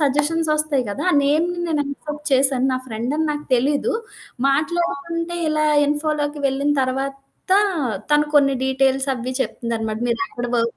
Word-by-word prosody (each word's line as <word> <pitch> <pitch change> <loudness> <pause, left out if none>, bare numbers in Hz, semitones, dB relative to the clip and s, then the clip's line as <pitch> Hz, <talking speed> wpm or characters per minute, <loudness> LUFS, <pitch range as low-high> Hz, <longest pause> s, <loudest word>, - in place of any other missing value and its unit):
సజెషన్సొస్తాయి 300 0 +1
గదా! 200 - -3 0.2
నేమ్‌ని 325 +5 +1
నేను 310 -3 +1
యాక్సెప్ట్ 295 +1 -7
చేశాను. 265 -1 +3
నా - - +1
ఫ్రెండని 255 +7 -2
నాకు 295 0 -4
తెలీదు. 285 - +1 0.6
మాట్లాడకుంటే 335 +3 -1
ఇలా 305 0 +1 0.2
ఇన్ఫోలోకి 295 0 -1
వెళ్ళిన 275 +2 +1
తర్వాత 270 +1 -3 0.9
తను 295 0 +4
కొన్ని 275 -2 +5
డీటెయిల్స్ 265 +1 +1
అవి 250 +1 -4
చెప్తుందనమాట. 225 -4 -2
మీరెక్కడ 245 -2 -2
వర్క్ 230 0 0
285 Hz, 125 wpm, -21 LUFS, 265-305 Hz, 0.9 s, కొన్ని